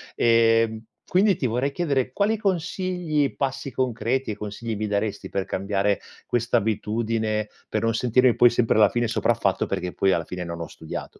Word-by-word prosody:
Ehm, 115 -1 +3 0.2
quindi 195 0 +3
ti 135 - -2
vorrei 125 +5 0
chiedere 140 -7 0
quali 205 +8 +1
consigli, 180 -5 -1
passi 135 0 -2
concreti 125 0 -1
e - - -4
consigli 105 +2 -5
mi 105 +1 -2
daresti 100 0 -2
per 95 -1 -2
cambiare 100 +1 0 0.3
questa 120 0 +1
abitudine, 110 0 -1 0.2
per - - -1
non 115 0 +2
sentirmi 125 +1 +3
poi 120 - +6
sempre 120 -1 +1
alla 105 -2 +6
fine 120 +3 0
sopraffatto 110 - +1
perché 90 0 -3
poi 95 -1 +2
alla 85 - +1
fine 90 +1 -5
non 85 0 -6
ho 85 - -5
studiato, 80 - -8
115 Hz, 170 wpm, -24 LUFS, 105-135 Hz, 0.3 s, poi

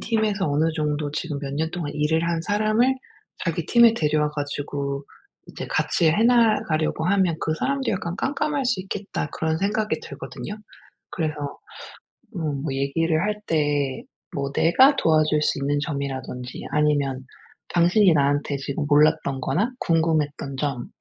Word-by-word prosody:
팀에서 215 -5 0
어느 155 +3 +2
정도 150 -1 -1
지금 150 -1 -3
몇 140 -1 -5
년 160 +2 -1
동안 160 -5 -4
일을 150 +2 +1
한 165 -1 0
사람을 215 +6 +2 0.5
자기 170 -2 -2
팀에 235 -1 +6
데려와 150 -5 +1
가지고 145 -1 -4 0.4
이제 - - -7
같이 165 -3 +2
해나가려고 215 -8 +2
하면 185 -4 +2
'그 155 - 0
사람도 275 -1 0
약간 175 -3 -2
깜깜할 285 0 -1
수 240 -6 +1
있겠다.' 195 -5 -4
그런 160 0 -1
생각이 210 +3 0
들거든요. 210 - -7 0.6
그래서 155 -3 -1 1.0
음 150 -4 -2
뭐 155 - -2
얘기를 155 +4 0
할 210 +1 -1
때 145 -4 0 0.3
뭐 140 0 -2
내가 260 - +5
도와줄 155 - +3
수 - - +1
있는 145 +1 0
점이라든지 135 -4 -5
아니면 145 -3 +1 0.5
당신이 175 +2 +4
나한테 145 -1 +1
지금 140 +2 -3
몰랐던 145 -2 +3
거나 205 - 0
궁금했던 155 -4 0
점 135 -4 -2
155 Hz, 305 characters per minute, -24 LUFS, 145-195 Hz, 1.0 s, 팀에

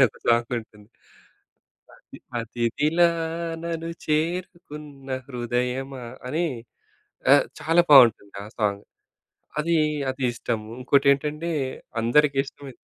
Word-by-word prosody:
అనె 130 - +9
ఒక - - -21
సాంగ్ 115 0 +3
ఉంటుంది. 105 -2 -18 1.1
అతి - - -15 0.2
అతిథిలా 120 +9 +1 0.6
నను 165 -1 -4 0.2
చేరుకున్న 150 -3 -3 0.2
హృదయమా! 125 +1 -3 0.2
అని 160 +7 -1 0.9
ఆహ్, - - +5
చాలా 165 +3 +4
బావుంటుంది 120 -8 +6
ఆ - - -9
సాంగ్. 100 -2 0 0.8
అది 165 +2 +1 0.3
అది 130 +1 -7
ఇష్టము 110 -2 -4
ఇంకోటేంటంటే 140 +4 +2 0.5
అందరికి 140 +5 +3
ఇష్టమై 140 0 -11
135 Hz, 100 wpm, -24 LUFS, 120-150 Hz, 1.1 s, అనె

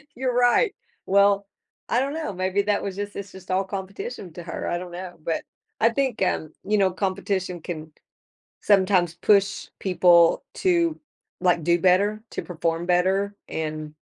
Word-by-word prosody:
you're 250 -1 -1
right, 245 - +4 0.3
well, 200 0 +4 0.4
I 240 - +3
don't 275 +2 -1
know, 315 -10 -3
maybe 185 +2 0
that 205 0 +1
was 195 -2 -4
just 205 0 -5
it's 200 -1 -6
just 190 -1 -9
all 190 +1 +2
competition 195 -1 -6
to 175 - -8
her, 165 - -5
I 175 - 0
don't 180 0 -7
know, 180 0 -7
but, 165 - -1 0.4
I 230 - +6
think, 260 -2 -1
um, 160 -4 0
you 210 +1 +1
know, 195 -1 +4
competition 190 -1 -2
can 160 -3 -6 0.7
sometimes 185 -4 +3
push 200 +1 +2
people 175 -3 +5
to, 340 -4 +2 0.4
like, 180 -2 +3
do 170 +2 +3
better, 200 +5 +2
to - - -3
perform 165 0 -2
better, 190 +3 +1
and, 155 -1 -4
190 Hz, 160 wpm, -24 LUFS, 175-205 Hz, 0.7 s, I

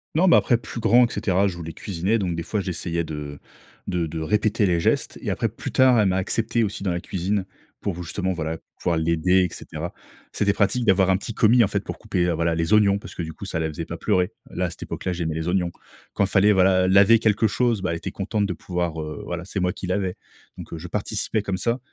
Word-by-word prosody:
Non, 185 +4 +4
mais 170 - +7
après 120 - +3
plus 120 - -8
grand 120 +1 +5
et - - -7
cetera 95 +1 +1
je 90 - -3
voulais 80 -1 -6
cuisiner, 100 +4 -1
donc 90 -5 -1
des 85 - -3
fois 105 - -2
j'essayais 85 -2 -2
de 75 -2 -6 0.5
de 85 -2 0
de 80 +1 -5
répéter 105 +5 +1
les 85 -2 +2
gestes - - 0
et - - -3
après - - 0
plus - - -7
tard, 130 -3 +5
elle 105 - +4
m'a 95 0 +1
accepté 115 +4 0
aussi 100 -1 -3
dans 95 - 0
la 85 - -1
cuisine 95 +1 -2 0.3
pour 90 -3 -3
justement, 95 +3 -2
voilà, 80 -1 -3 0.2
pouvoir 85 -2 0
l'aider 85 +3 +3
et - - +1
cetera 80 +2 -6 0.4
c'était 100 0 +2
pratique 105 +5 +1
d'avoir 95 -2 +4
un - - +4
petit 105 +4 -4
commis, 115 +2 +5
en - - +3
fait, - - -1
pour - - -7
couper, 90 -1 0
heu, 90 - +1
voilà, 85 0 0
les 85 +5 0
oignons 100 -2 +5
parce - - -10
que - - -5
du 80 -1 -5
coup, 100 - -9
ça 85 -4 -3
la 80 - 0
faisait 75 - -5
pas - - -6
pleurer. 90 -1 +1 0.2
Là, - - -2
à - - -1
cette - - -11
époque-là, 90 - -4
j'aimais 80 -2 -2
les 80 +1 -3
oignons. 90 -1 +1 0.4
Quand 100 - +2
fallait, 100 +2 +4
voilà, 95 -1 +4
laver 100 +4 +6
quelque 110 0 +2
chose, 115 -1 +1
bah 90 - 0
elle 85 - -2
était - - -6
contente 100 +1 -1
de 90 - -2
pouvoir, 85 -2 -3
heu, 75 -1 -6
voilà, 90 +1 -5
c'est 100 0 -4
moi 90 0 0
qui - - -7
lavais. 95 -1 -1 0.4
Donc - - -9
heu, - - -4
je 90 - -7
participais 105 +2 -2
comme 95 -2 -2
ça 115 +6 0
95 Hz, 250 wpm, -23 LUFS, 85-105 Hz, 0.5 s, mais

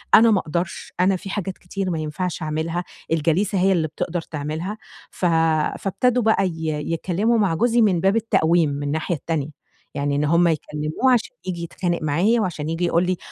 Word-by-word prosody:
أنا 225 0 +7
ما 200 - +4
أقدَرش، 170 +2 -4
أنا 190 +1 +4
في 195 +2 -7
حاجات 190 -2 -3
كتير 190 +1 -4
ما 165 -3 -1
ينفَعش 160 +3 -3
أعملها، 160 +3 -2 0.3
الجليسة 165 +5 +1
هي 190 +2 +3
اللي 165 -4 +1
بتقدَر 165 +3 -3
تعملها، 160 +7 -5 0.3
ف - - -3 0.5
فابتدوا 245 +5 +1
بقى 220 -3 +3
ي 160 -2 -4 0.2
يتكلّموا 195 +8 +1
مع 195 -6 +2
جوزي 235 +4 +3
من 190 -6 +3
باب 195 +3 +3
التقويم 175 -8 +2
من 145 0 -4
الناحية 155 +4 -1
التانية، 155 -1 -2 0.5
يعني 145 0 -1
إن 145 - +1
هُم 170 +3 +4
يكلّموه 155 - 0
عشان 245 +1 0
ييجي 175 -2 -4
يتخانق 175 +1 -2
معايا 180 +10 +2
وعشان 160 -5 -3
ييجي 165 +2 -1
يقول 170 +1 +2
لي، 185 -1 0
175 Hz, 180 wpm, -22 LUFS, 160-195 Hz, 0.5 s, أنا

